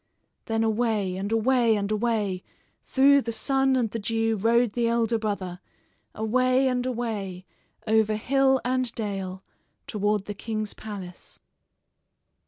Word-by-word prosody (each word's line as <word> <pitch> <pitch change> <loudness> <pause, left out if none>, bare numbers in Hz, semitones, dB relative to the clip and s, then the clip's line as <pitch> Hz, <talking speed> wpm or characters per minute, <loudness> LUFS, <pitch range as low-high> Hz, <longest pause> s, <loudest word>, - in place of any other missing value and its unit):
Then 225 0 0
away, 220 -4 0
and 195 +3 -4
away, 230 0 +3
and 205 0 -2
away, 210 -4 0 0.4
through 280 +1 +5
the 230 - -4
sun 270 +3 +1
and 235 -4 0
the 230 - -3
dew 225 +1 0
rode 230 +2 +2
the 235 -1 +1
elder 230 -1 +1
brother 190 -4 -3 0.6
away 255 +4 +2
and 250 -1 0
away 210 -7 -4 0.4
over 220 -1 +3
hill 265 +4 +2
and 255 -1 +1
dale 195 -3 -4 0.4
toward 205 -1 -1
the 205 - -5
king's 215 0 -4
palace. 195 -5 -9
225 Hz, 130 wpm, -26 LUFS, 205-245 Hz, 0.6 s, through